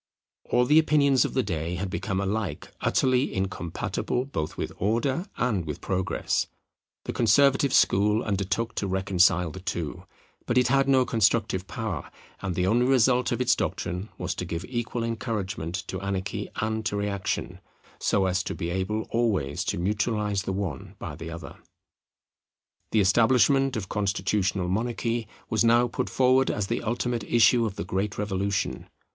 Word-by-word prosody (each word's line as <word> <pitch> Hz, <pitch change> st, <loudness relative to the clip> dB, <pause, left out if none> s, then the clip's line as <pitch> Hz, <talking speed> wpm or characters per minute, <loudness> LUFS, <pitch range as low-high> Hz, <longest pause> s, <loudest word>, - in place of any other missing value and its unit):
All 125 Hz, -, +2 dB
the 150 Hz, +5 st, +6 dB
opinions 140 Hz, -4 st, +4 dB
of -, -, -4 dB
the 130 Hz, -, +2 dB
day 85 Hz, -3 st, -3 dB
had 95 Hz, +1 st, -3 dB
become 95 Hz, -1 st, -2 dB
alike 100 Hz, +1 st, -3 dB
utterly 130 Hz, 0 st, +2 dB
incompatible 95 Hz, +5 st, -2 dB
both 80 Hz, -, -4 dB
with -, -, -3 dB
Order 125 Hz, -, 0 dB
and 110 Hz, -7 st, 0 dB
with 75 Hz, -, -4 dB
Progress. 95 Hz, -1 st, -1 dB, 0.6 s
The -, -, -3 dB
Conservative 135 Hz, +4 st, +4 dB
school 105 Hz, +3 st, +3 dB
undertook 105 Hz, +3 st, -1 dB
to 100 Hz, -, -1 dB
reconcile 90 Hz, -2 st, +2 dB
the 95 Hz, -, -8 dB
two; 85 Hz, -4 st, -4 dB, 0.4 s
but 120 Hz, -, +1 dB
it 125 Hz, -2 st, +4 dB
had 135 Hz, +1 st, +3 dB
no 130 Hz, -2 st, +5 dB
constructive 105 Hz, -5 st, +1 dB
power; 110 Hz, -7 st, -4 dB, 0.3 s
and 95 Hz, -2 st, -3 dB
the 90 Hz, -, +1 dB
only 120 Hz, +6 st, +3 dB
result 125 Hz, -1 st, +3 dB
of 120 Hz, -, -1 dB
its 125 Hz, -1 st, +4 dB
doctrine 90 Hz, +5 st, -3 dB
was -, -, -2 dB
to -, -, -5 dB
give 85 Hz, +2 st, -4 dB
equal 120 Hz, -1 st, -3 dB
encouragement 105 Hz, -7 st, -3 dB
to 95 Hz, -, -4 dB
anarchy 100 Hz, 0 st, -3 dB
and 110 Hz, +1 st, -1 dB
to 105 Hz, -, -2 dB
reaction, 100 Hz, -1 st, -2 dB, 0.4 s
so 95 Hz, -, +2 dB
as 90 Hz, -1 st, +1 dB
to -, -, -3 dB
be 85 Hz, +1 st, -3 dB
able 95 Hz, +4 st, -1 dB
always 100 Hz, -12 st, 0 dB
to -, -, -1 dB
neutralize 105 Hz, +2 st, 0 dB
the 95 Hz, -, -3 dB
one 95 Hz, -7 st, -4 dB
by 75 Hz, -, -6 dB
the 80 Hz, +1 st, -7 dB
other. 85 Hz, 0 st, -8 dB, 1.3 s
The 110 Hz, -, +4 dB
establishment 125 Hz, +6 st, +4 dB
of 100 Hz, -4 st, -4 dB
Constitutional 95 Hz, -1 st, 0 dB
Monarchy 115 Hz, +3 st, -1 dB, 0.2 s
was 110 Hz, +1 st, +1 dB
now 120 Hz, +1 st, +5 dB
put -, -, -3 dB
forward 130 Hz, +1 st, +3 dB
as 105 Hz, -, -1 dB
the 115 Hz, +4 st, -2 dB
ultimate 120 Hz, 0 st, -1 dB
issue 115 Hz, +1 st, +4 dB
of 100 Hz, -, -6 dB
the -, -, -4 dB
great 95 Hz, +3 st, -2 dB
Revolution. 100 Hz, -1 st, -2 dB
105 Hz, 160 wpm, -26 LUFS, 95-120 Hz, 1.3 s, the